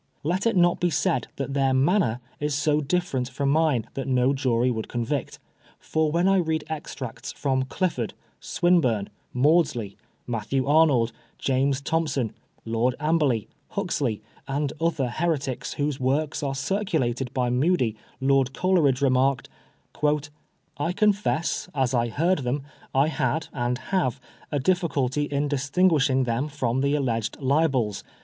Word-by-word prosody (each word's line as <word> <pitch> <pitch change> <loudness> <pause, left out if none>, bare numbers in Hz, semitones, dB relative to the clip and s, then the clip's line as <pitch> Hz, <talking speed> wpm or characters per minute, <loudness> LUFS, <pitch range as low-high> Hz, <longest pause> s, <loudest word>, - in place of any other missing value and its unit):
Let 180 +8 0
it 230 - +1
not 175 0 +4
be 175 - +2
said 130 -6 0
that 140 0 -4
their 135 -1 +2
manner 135 - +2 0.2
is 150 -1 -1
so 150 0 +2
different 140 -5 -1
from 140 +1 0
mine 150 -7 +2
that 135 0 -4
no 130 0 +3
jury 125 -2 +1
would 110 -2 -3
convict; 125 +4 -3 0.4
for 155 -1 0
when 170 +3 +2
I 195 0 +4
read 160 -3 0
extracts 135 -5 -6
from 130 -2 0
Clifford^ 130 - -2 0.3
Swinburne, 130 - +1 0.2
Maudsley, 140 - +2 0.3
Matthew 120 +3 -1
Arnold, 140 -6 +4 0.3
James 135 +1 +1
Thom 160 +3 0
son, 130 -6 -2 0.3
Lord 115 +2 +1
Amberley, 150 -8 +1 0.2
Huxley, 155 - -2 0.2
and 140 +1 -1
other 165 -6 +1
heretics 140 -2 -2
whose 145 -1 -2
works 140 +5 0
are 135 -2 -2
circulated 135 - -1
by 125 -2 0
Mudie, 125 -3 +2 0.2
Lord 135 -1 +2
Coleridge 160 -8 +2
remarked 130 0 +2 0.6
" 150 -2 -10
I 165 +5 0
confess, 200 -4 +1
as 130 -2 +1
I 120 -1 +2
heard 170 +9 +1
them, 135 +2 -2 0.3
I 135 +3 +4
had, 150 0 -1
and 125 -2 -1
have 130 -1 -1 0.3
a 145 - 0
difficulty 145 -4 +1
in 145 0 -1
distinguishing 140 -1 +2
them 120 +4 -1
from 130 -4 -1
the 140 +1 +2
alleged 115 -6 -1
libels. 135 -6 +1
140 Hz, 140 wpm, -25 LUFS, 125-160 Hz, 0.6 s, not